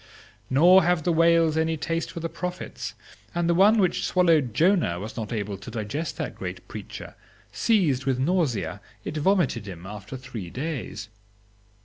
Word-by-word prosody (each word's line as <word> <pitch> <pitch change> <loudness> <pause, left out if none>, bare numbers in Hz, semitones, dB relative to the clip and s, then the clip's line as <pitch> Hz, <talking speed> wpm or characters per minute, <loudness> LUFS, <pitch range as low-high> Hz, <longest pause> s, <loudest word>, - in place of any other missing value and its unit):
Nor 175 +8 +7
have 175 -2 +1
the 175 - +2
whales 165 -1 +4
any 160 0 +1
taste 165 +2 -2
for 170 - -7
the 165 - -1
prophets, 180 +2 -5 0.4
and 170 -1 +1
the 170 - +3
one 200 +6 +5
which 185 -4 +2
swallowed 165 -8 +3
Jonah 165 - +3
was 105 +3 -7
not 110 -2 -5
able 105 -3 -3
to 100 - -9
digest 115 +9 -4
that - - -3
great - - -7
preacher; - - -8 0.4
seized 165 - +2
with 135 -2 +1
nausea, 130 - 0 0.2
it - - -4
vomited 155 - +1
him 90 -2 -8
after 105 +5 -7
three 125 -8 -7
days. 130 - -5
155 Hz, 160 wpm, -25 LUFS, 110-170 Hz, 0.4 s, Nor